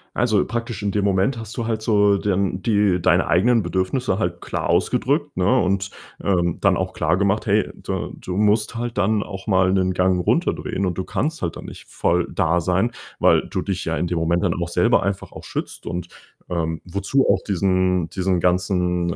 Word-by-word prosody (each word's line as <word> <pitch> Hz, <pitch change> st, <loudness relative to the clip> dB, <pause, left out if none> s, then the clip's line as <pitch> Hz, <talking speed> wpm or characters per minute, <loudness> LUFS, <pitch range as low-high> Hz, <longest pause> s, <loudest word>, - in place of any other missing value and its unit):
Also, 110 Hz, -5 st, +2 dB
praktisch 115 Hz, -2 st, -4 dB
in 100 Hz, -, 0 dB
dem 105 Hz, 0 st, 0 dB
Moment 100 Hz, +6 st, +1 dB
hast 110 Hz, +2 st, -8 dB
du 115 Hz, -, -2 dB
halt 110 Hz, -1 st, -2 dB
so 105 Hz, -2 st, +3 dB
dann 95 Hz, -2 st, -1 dB
die 100 Hz, -5 st, +2 dB
deine 90 Hz, +2 st, +3 dB
eigenen 110 Hz, +7 st, +3 dB
Bedürfnisse 95 Hz, +5 st, -1 dB
halt 85 Hz, 0 st, -2 dB
klar -, -, -3 dB
ausgedrückt, -, -, +1 dB
ne? 100 Hz, +8 st, +3 dB
Und, 95 Hz, -1 st, 0 dB, 0.3 s
ähm, 85 Hz, -3 st, +1 dB
dann -, -, +3 dB
auch -, -, -2 dB
klargemacht: 95 Hz, +6 st, +1 dB
„Hey, 105 Hz, +1 st, +2 dB
da -, -, -4 dB
du 90 Hz, 0 st, -6 dB
musst 105 Hz, +1 st, +2 dB
halt 120 Hz, -2 st, -3 dB
dann 105 Hz, +1 st, +2 dB
auch 95 Hz, 0 st, -9 dB
mal 95 Hz, -2 st, +3 dB
'nen 95 Hz, -1 st, +2 dB
Gang 90 Hz, -1 st, +2 dB
runterdrehen" 95 Hz, -, 0 dB
und 90 Hz, -1 st, -2 dB
du 95 Hz, -, -1 dB
kannst 155 Hz, -, -2 dB
halt 85 Hz, -2 st, -2 dB
dann -, -, -9 dB
nicht -, -, -11 dB
voll 90 Hz, 0 st, 0 dB
da 85 Hz, -1 st, +1 dB
sein, 95 Hz, +7 st, +1 dB, 0.3 s
weil -, -, +3 dB
du -, -, -2 dB
dich 95 Hz, -2 st, -3 dB
ja 80 Hz, 0 st, -1 dB
in -, -, -1 dB
dem 85 Hz, -1 st, -1 dB
Moment 85 Hz, +2 st, +1 dB
dann 90 Hz, -4 st, +2 dB
auch 85 Hz, 0 st, -3 dB
selber 115 Hz, +7 st, +3 dB
einfach 100 Hz, 0 st, -3 dB
auch -, -, -10 dB
schützt -, -, -6 dB
und, 90 Hz, +1 st, -4 dB, 0.4 s
ähm, 80 Hz, -2 st, -2 dB
wozu 100 Hz, +9 st, 0 dB
auch -, -, +3 dB
diesen 95 Hz, -2 st, +1 dB
diesen 90 Hz, 0 st, 0 dB
ganzen 90 Hz, -1 st, 0 dB
95 Hz, 195 wpm, -22 LUFS, 90-105 Hz, 0.4 s, so